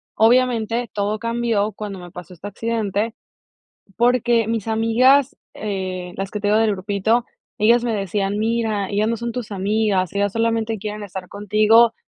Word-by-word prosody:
obviamente 235 0 +2
todo 205 +1 -1
cambió 230 -2 0
cuando 205 -3 -6
me 175 0 -10
pasó 180 0 -10
este 180 +3 -9
accidente, 220 0 -2 0.8
porque 240 -1 +3
mis 225 -2 -2
amigas, 245 +5 +3 0.2
eh, 185 -3 -4
las 195 0 -3
que 210 - -3
te 205 - -2
digo 215 +1 +4
del 225 -1 +3
grupito, 205 +4 0 0.3
ellas 235 +3 +4
me 235 -2 0
decían 200 0 -1
mira 220 -3 0
ellas 205 +2 +1
no 230 - -1
son 235 +1 -4
tus 240 -3 -5
amigas, 200 -1 0
ellas 200 0 0
solamente 225 -1 0
quieren 210 +1 -5
estar 190 -2 -7
contigo, 215 +3 +4
215 Hz, 160 wpm, -21 LUFS, 200-230 Hz, 0.8 s, digo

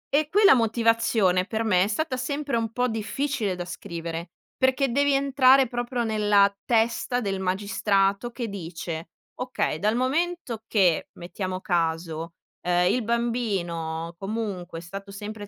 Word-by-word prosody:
E, 300 0 +2
quella 405 0 +6
motivazione, 225 -5 +2
per 220 +2 -2
me 185 -5 +3
è - - -2
stata 255 +5 -1
sempre 280 +1 -2
un 225 -1 -1
po' 250 +2 0
difficile 220 0 -2
da 175 0 -5
scrivere, 170 -2 -6 0.3
perché 260 0 +2
devi 285 +3 +2
entrare 270 -1 +5
proprio 240 +1 -2
nella 205 -2 +3
testa 235 +1 +1
del 195 -5 -2
magistrato, 195 +2 +1
che 240 0 -5
dice: 165 -4 -6 0.3
"Okay 250 -11 -2
dal 210 +5 +1
momento 270 -1 -1
che 185 -6 +2
mettiamo 185 +1 -5
caso, 165 -2 -1 0.3
uhm, 180 0 +2
il 250 - +1
bambino 190 -9 -2
comunque 195 -4 -4
è 165 - -6
stato 195 +3 -8
sempre 205 +1 -7
210 Hz, 140 wpm, -25 LUFS, 180-245 Hz, 0.3 s, quella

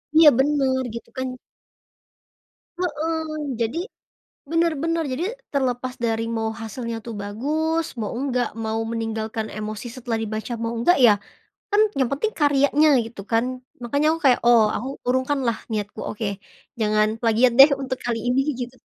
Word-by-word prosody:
Iya 320 -1 +9
bener 270 -2 +2
gitu 235 - -8
kan 260 0 -1 1.5
Heeh, 310 -4 -2
jadi, 230 +8 -1 0.7
bener 335 0 +2
bener 330 0 0
jadi 320 +8 -2 0.3
terlepas 255 -2 -1
dari 225 0 0
mau 225 0 -1
hasilnya 230 +1 -5
tuh 230 - -5
bagus, 310 +10 -1 0.2
mau 210 - -3
enggak, 250 -3 0 0.2
mau 220 +1 -1
meninggalkan 220 -1 -3
emosi 215 +2 -5
setelah 240 -2 -2
dibaca 220 +2 -4
mau 230 - -1
enggak 350 +10 +4
ya, 215 - +7 0.6
kan 415 +1 +4 0.2
yang 255 - +2
penting 430 +11 -1
karyanya 285 +1 +4 0.2
gitu 225 -3 -9
kan. 225 +1 +3 0.4
Makanya 285 +5 0
aku 325 - -4
kayak 255 -3 +5
oh 235 -2 +7
aku 255 +5 -3 0.2
urungkanlah 260 -2 +1
niatku, 210 -1 -3
"Oke 215 +1 -4 0.6
jangan 215 0 +3
plagiat 235 +2 +4
deh 275 - +11
untuk 260 -1 -3
kali 235 -1 -1
ini," 250 +2 +2 0.2
gitu. 245 +1 -6
250 Hz, 145 wpm, -23 LUFS, 225-290 Hz, 1.5 s, deh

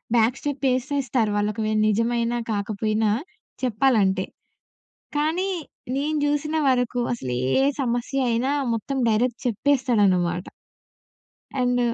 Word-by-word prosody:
Back 235 +3 +3
step 285 -1 -3
ఏసేస్తారు 255 -4 0
వాలకోవేల 215 +1 0
నిజమైన 230 +2 +1 0.2
కాకపోయినా 215 +1 0 0.5
చెప్పాలంటే. 215 -6 +2 0.9
కానీ 320 +6 +1 0.5
నేను 300 +2 0
జూసిన 295 +2 0
వరకు 245 -1 +1
అసలు 130 - -4 0.3
ఏ - - +4 0.2
సమస్య 245 +2 -1
అయినా 240 +4 +1 0.2
మొత్తం 270 +5 -3
డైరెక్ట్ 235 +2 +1
చెప్పేస్తాడన్నమాట. 205 -8 +2 1.1
అండ్ 245 0 +2
235 Hz, 95 wpm, -24 LUFS, 215-270 Hz, 1.1 s, ఏ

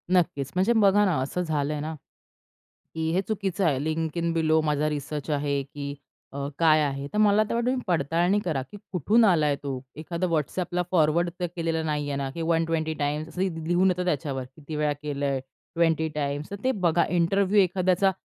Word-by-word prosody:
नक्कीच. 175 -7 +1
म्हणजे 190 +6 +3
बघा 205 -2 +5
ना, 185 -5 +2
असं 140 +7 -2
झालंय 150 -3 -1
ना, 155 +2 -4 1.0
की 160 0 -1
हे 180 +3 +2
चुकीचं 195 -3 -1
आहे, 140 -4 +1
लिंक 160 +1 -2
इन 170 0 0
बिलो 160 -1 +3
माझा 150 0 +1
रिसर्च 150 +1 -4
आहे 145 -1 0
की 140 +1 -6 0.4
अ, 140 0 -3
काय 155 -2 +5
आहे. 140 -1 -2
तर - - -1
मला 210 0 +5
तर - - -1
वाटतं 235 0 0
तुम्ही 260 -1 -1
पडताळणी 170 +3 +2
करा 155 -6 0
की 205 - -9
कुठून 205 - +3
आलाय 155 -7 +3
तो? 140 - -3 0.2
एखादा 170 +4 -3
WhatsAppला 175 +2 -1
फॉरवर्ड 170 0 +3
तर 180 - 0
केलेलं 165 -2 -1
नाहीये 145 -2 -1
ना? 140 -1 -2
की 165 +5 -6
WhatsAppला 165 +1 0
120 165 -1 0
टाइम्स 150 +2 -1
असं 170 +3 -5
ली 190 - +2 0.2
लिहून 180 +2 +3
येत 180 - -3
त्याच्यावर, 140 -5 -1
किती 155 0 -8
वेळा 150 0 +1
केलंय, 140 -2 -2 0.4
20 165 -1 +2
टाइम्स 145 0 -2
तर - - -3
ते 260 - +3
बघा, 170 0 +3
इंटरव्ह्यू 190 +4 +2
एखाद्याचा 185 +1 +2
160 Hz, 190 wpm, -26 LUFS, 145-180 Hz, 1.0 s, बघा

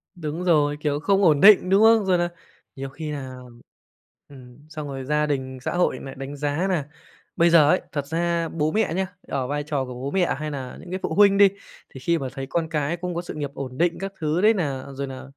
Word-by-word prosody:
Đúng 160 0 -5
rồi, 150 -4 +2
kiểu, 145 -1 -1
không 195 +4 +2
ổn 155 -5 +4
định, 195 -2 +7
đúng 195 +3 +5
không? 225 -2 +5
Rồi 185 -2 +3
là 175 0 0 0.5
nhiều 135 0 -6
khi 155 +2 -6
nà 130 -3 -6 0.9
ừm, 125 -3 -14
xong 155 -2 -6
rồi 135 -1 -6
gia 150 +2 +1
đình, 130 -3 -3
xã - - -3
hội 175 -7 +1
lại 135 - -9
đánh 135 +2 -7
giá 145 +6 -1
nà 155 -6 -1 0.5
bây 170 +1 +4
giờ 155 -3 +6
ấy, 180 - +3
thật 145 -3 -3
ra 170 +1 -1
bố 155 -1 -1
mẹ 220 -4 0
nhá, 190 +2 -1 0.2
ở 130 -2 -2
vai 145 +2 -2
trò 145 -3 -2
của 125 - -8
bố 130 +3 -5
mẹ 185 -6 +1
hay 155 0 -4
nà 130 -3 -6
những 180 - -12
cái 185 - -3
phụ - - -2
huynh 200 -1 +5
đi, 200 -1 +7 0.4
thì 135 - -9
khi 170 +5 +1
mà 135 - -4
thấy 135 -1 -5
con 165 -2 -1
cái 155 +1 -1
cũng 180 0 -4
có 170 - -1
sự 175 - -8
nghiệp 145 -2 -4
ổn 130 -2 -7
định 170 +1 +1
các 195 0 -5
thứ 155 +3 0
đấy 220 +2 +5
nà 140 -10 -3
rồi 140 +1 -4
nà 130 -1 -8
150 Hz, 245 wpm, -24 LUFS, 140-175 Hz, 0.9 s, định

